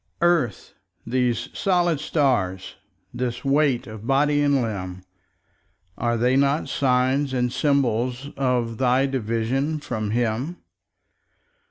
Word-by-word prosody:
Earth, 165 Hz, -, +1 dB, 0.3 s
these 125 Hz, -1 st, 0 dB
solid 175 Hz, -5 st, +1 dB
stars, 120 Hz, -, 0 dB, 0.4 s
this 125 Hz, +1 st, -3 dB
weight 140 Hz, -2 st, +2 dB
of 110 Hz, 0 st, -9 dB
body 145 Hz, +2 st, +3 dB
and 145 Hz, -1 st, +3 dB
limb, 95 Hz, -6 st, -4 dB, 0.9 s
Are 120 Hz, 0 st, 0 dB
they 125 Hz, +3 st, +2 dB
not 140 Hz, +3 st, +2 dB
sign 130 Hz, +1 st, +1 dB
and 125 Hz, -1 st, 0 dB
symbol 130 Hz, -5 st, +1 dB, 0.2 s
of 125 Hz, -4 st, -1 dB
thy 130 Hz, +1 st, +3 dB
division 135 Hz, +4 st, -1 dB
from 110 Hz, -7 st, -4 dB
Him? 120 Hz, +8 st, -1 dB
125 Hz, 110 wpm, -23 LUFS, 115-140 Hz, 0.9 s, body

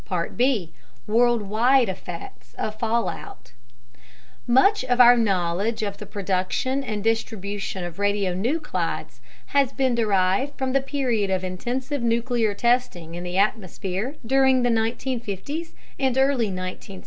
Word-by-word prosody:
B. 230 Hz, -10 st, +1 dB, 0.3 s
Worldwide 235 Hz, +2 st, +3 dB
Effects 180 Hz, -2 st, -8 dB
of 215 Hz, 0 st, -4 dB
Fallout 235 Hz, -, -3 dB, 1.0 s
Much 265 Hz, -, +4 dB
of 250 Hz, -1 st, 0 dB
our 245 Hz, 0 st, +9 dB
knowledge 200 Hz, 0 st, 0 dB
of 200 Hz, -1 st, -3 dB
the 210 Hz, -, -9 dB
production 200 Hz, +7 st, -1 dB
and 210 Hz, -5 st, -4 dB
distribution 205 Hz, -4 st, -2 dB
of 175 Hz, 0 st, -6 dB
radionuclides 205 Hz, -, -1 dB, 0.3 s
has 280 Hz, -2 st, +3 dB
been 265 Hz, -3 st, +1 dB
derived 210 Hz, +4 st, +1 dB
from 265 Hz, -1 st, -1 dB
the 275 Hz, -, +3 dB
period 255 Hz, -7 st, -1 dB
of 190 Hz, -1 st, 0 dB
intensive 245 Hz, +9 st, -3 dB
nuclear 235 Hz, -2 st, +1 dB
testing 235 Hz, -9 st, 0 dB
in 175 Hz, +1 st, -6 dB
the 180 Hz, +1 st, -3 dB
atmosphere 200 Hz, -, -1 dB
during 265 Hz, 0 st, +4 dB
the 245 Hz, -, +3 dB
1950's 235 Hz, -, -3 dB, 0.2 s
and 265 Hz, -2 st, +1 dB
early 265 Hz, -5 st, +2 dB
1960's. 185 Hz, +1 st, -6 dB
225 Hz, 125 wpm, -24 LUFS, 195-255 Hz, 1.0 s, our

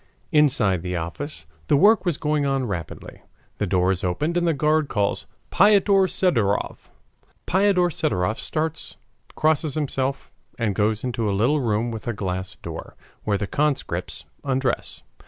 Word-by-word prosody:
Inside 130 Hz, -, +3 dB
the 90 Hz, +1 st, -3 dB
office 85 Hz, -, -5 dB, 0.2 s
the 145 Hz, -, +4 dB
work 210 Hz, +6 st, +5 dB
was 170 Hz, -5 st, 0 dB
going 150 Hz, -1 st, 0 dB
on 135 Hz, -2 st, 0 dB
rapidly. 85 Hz, -8 st, -6 dB, 0.4 s
The 105 Hz, -, 0 dB
door 90 Hz, 0 st, +2 dB
is 95 Hz, -, -2 dB
opened 145 Hz, -, -1 dB
and 175 Hz, 0 st, +1 dB
the -, -, +4 dB
guard 155 Hz, +1 st, +2 dB
calls 100 Hz, -5 st, -1 dB, 0.2 s
Piotr 200 Hz, -1 st, +5 dB
Sidorov. 115 Hz, -, 0 dB, 0.6 s
Piotr 190 Hz, -2 st, +3 dB
Sidorov 100 Hz, -, -1 dB
starts, 160 Hz, 0 st, -3 dB, 0.4 s
crosses 155 Hz, -2 st, +1 dB
himself, 135 Hz, -2 st, -2 dB, 0.3 s
and 110 Hz, -4 st, 0 dB
goes 105 Hz, +1 st, 0 dB
into 120 Hz, -4 st, -1 dB
a 100 Hz, -, 0 dB
little 135 Hz, +9 st, +2 dB
room 115 Hz, 0 st, 0 dB
with 110 Hz, -1 st, -7 dB
a 120 Hz, -, 0 dB
glass 95 Hz, -2 st, -4 dB
door, -, -, -8 dB, 0.3 s
where 100 Hz, -1 st, +1 dB
the 100 Hz, -, -2 dB
conscripts 145 Hz, +6 st, -2 dB, 0.2 s
undress. 130 Hz, -2 st, -2 dB
130 Hz, 150 wpm, -23 LUFS, 100-155 Hz, 0.6 s, work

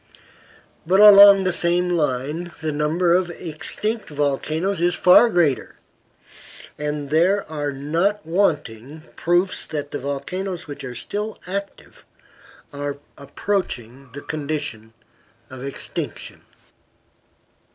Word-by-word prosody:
But 185 Hz, +4 st, +2 dB
along 200 Hz, -1 st, +9 dB
the 185 Hz, -1 st, 0 dB
same 175 Hz, +1 st, +1 dB
line 150 Hz, +1 st, -2 dB
the 155 Hz, -1 st, -1 dB
number 160 Hz, +4 st, +1 dB
of 180 Hz, 0 st, +1 dB
extinct 180 Hz, +7 st, -4 dB
volcanoes 155 Hz, +5 st, -1 dB
is 175 Hz, 0 st, +2 dB
far 185 Hz, +6 st, +6 dB
greater, 170 Hz, -, 0 dB, 1.0 s
and 150 Hz, -1 st, -4 dB
there 185 Hz, +6 st, +2 dB
are 145 Hz, -2 st, -3 dB
not 165 Hz, +9 st, -1 dB
wanting 155 Hz, -, -1 dB
proofs 175 Hz, +2 st, 0 dB
that 145 Hz, -2 st, -5 dB
the 145 Hz, -, -4 dB
volcanoes 170 Hz, +7 st, -4 dB
which 145 Hz, -2 st, -9 dB
are 125 Hz, -2 st, -7 dB
still 210 Hz, -, -4 dB
active 200 Hz, +2 st, -7 dB, 0.7 s
are 145 Hz, 0 st, -4 dB, 0.2 s
approaching 135 Hz, -, -4 dB
the 145 Hz, -, -7 dB
condition 145 Hz, -8 st, -5 dB, 0.6 s
of 130 Hz, -1 st, -9 dB
extinction. 140 Hz, 0 st, -6 dB
155 Hz, 110 wpm, -21 LUFS, 145-185 Hz, 1.0 s, along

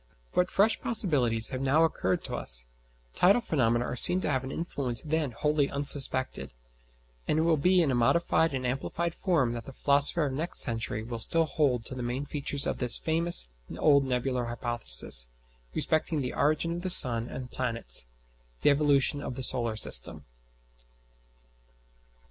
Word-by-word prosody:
But 180 Hz, 0 st, 0 dB
fresh 210 Hz, +3 st, +1 dB
possibilities 130 Hz, -, +1 dB
have 130 Hz, -1 st, -6 dB
now 140 Hz, +4 st, +2 dB
occurred 95 Hz, -, -2 dB
to -, -, -6 dB
us, -, -, +1 dB, 0.5 s
tidal 195 Hz, +7 st, +3 dB
phenomena 120 Hz, -, -1 dB
are 125 Hz, -, -5 dB
seen 180 Hz, +8 st, +7 dB
to -, -, -3 dB
have 130 Hz, -1 st, -2 dB
an 130 Hz, -, -7 dB
influence 140 Hz, -8 st, -3 dB
then 155 Hz, -2 st, -2 dB
wholly 145 Hz, +4 st, -1 dB
unsuspected, 135 Hz, -, -2 dB, 0.7 s
and -, -, 0 dB
it 160 Hz, -, +1 dB
will 165 Hz, -1 st, +2 dB
be 180 Hz, +4 st, +2 dB
in 145 Hz, -, -1 dB
a -, -, -1 dB
modified 160 Hz, +4 st, 0 dB
and 130 Hz, -1 st, -5 dB
amplified 135 Hz, +6 st, -4 dB
form 155 Hz, -, -1 dB
that 120 Hz, -1 st, -8 dB
the 135 Hz, -, -10 dB
philosopher 145 Hz, +4 st, +4 dB
of 135 Hz, -, -4 dB
next 160 Hz, +6 st, -3 dB
century 115 Hz, -2 st, -2 dB
will 115 Hz, 0 st, -7 dB
still 165 Hz, +8 st, +2 dB
hold 135 Hz, -7 st, -1 dB
to -, -, -3 dB
the 130 Hz, -, -7 dB
main 125 Hz, +4 st, -4 dB
features 140 Hz, -1 st, -2 dB
of -, -, -4 dB
this 125 Hz, -2 st, +3 dB
famous 165 Hz, -, +1 dB, 0.3 s
old 140 Hz, -2 st, +3 dB
Nebular 125 Hz, -1 st, -3 dB
Hypothesis 120 Hz, -, -1 dB, 0.5 s
respecting 155 Hz, -1 st, -1 dB
the 125 Hz, -, -5 dB
origin 155 Hz, +3 st, -1 dB
of 175 Hz, -, -6 dB
the 185 Hz, -, -4 dB
sun 120 Hz, -8 st, +8 dB
and 125 Hz, -1 st, -9 dB
planets 115 Hz, -, -4 dB, 0.5 s
the -, -, +3 dB
Evolution 145 Hz, -1 st, +1 dB
of 130 Hz, -, -7 dB
the 130 Hz, -, -6 dB
solar 120 Hz, -3 st, +1 dB
system. -, -, +1 dB
135 Hz, 165 wpm, -27 LUFS, 120-160 Hz, 0.7 s, sun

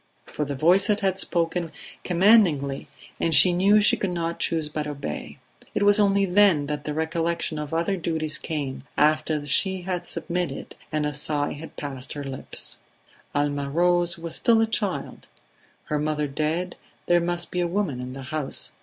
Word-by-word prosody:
For 150 Hz, -, -4 dB
the 140 Hz, 0 st, -4 dB
voices 190 Hz, +8 st, +4 dB
had 190 Hz, -1 st, 0 dB
spoken 170 Hz, -2 st, -1 dB, 0.3 s
commandingly 175 Hz, -8 st, +3 dB, 0.3 s
and 165 Hz, -, +1 dB
she 180 Hz, -, +8 dB
knew 200 Hz, +4 st, +4 dB
she 210 Hz, -, +4 dB
could 195 Hz, -, -2 dB
not 170 Hz, -1 st, -3 dB
choose 160 Hz, -2 st, 0 dB
but 150 Hz, 0 st, -4 dB
obey. 140 Hz, -, -6 dB, 0.4 s
It -, -, +1 dB
was 205 Hz, +1 st, +5 dB
only 200 Hz, -1 st, +3 dB
then 185 Hz, -5 st, +4 dB
that 145 Hz, 0 st, -5 dB
the 150 Hz, -, -3 dB
recollection 160 Hz, 0 st, -2 dB
of 150 Hz, -1 st, -6 dB
other 170 Hz, +4 st, 0 dB
duties 160 Hz, -2 st, +1 dB
came, 135 Hz, -4 st, -4 dB
after 155 Hz, 0 st, +2 dB
she 185 Hz, +6 st, +3 dB
had 180 Hz, -1 st, -4 dB
submitted, 170 Hz, -5 st, -4 dB, 0.2 s
and 150 Hz, -1 st, -1 dB
a 150 Hz, -, -2 dB
sigh 145 Hz, 0 st, -2 dB
had 160 Hz, +2 st, -10 dB
passed 135 Hz, -2 st, -6 dB
her 145 Hz, -, -6 dB
lips. 135 Hz, -1 st, -3 dB, 0.6 s
Alma 145 Hz, -1 st, -1 dB
Rose 175 Hz, +2 st, +1 dB
was 165 Hz, -1 st, -1 dB
still 230 Hz, -1 st, +3 dB
a 225 Hz, -, +4 dB
child; 215 Hz, -4 st, -3 dB, 0.6 s
her 150 Hz, -, -2 dB
mother 150 Hz, 0 st, -1 dB
dead, 155 Hz, +5 st, -2 dB, 0.3 s
there 175 Hz, 0 st, +3 dB
must 175 Hz, 0 st, -2 dB
be 180 Hz, -, -2 dB
a 175 Hz, -, +1 dB
woman 170 Hz, -8 st, -2 dB
in 125 Hz, 0 st, -6 dB
the 135 Hz, 0 st, -8 dB
house. 145 Hz, +1 st, -3 dB
165 Hz, 170 wpm, -24 LUFS, 150-180 Hz, 0.6 s, she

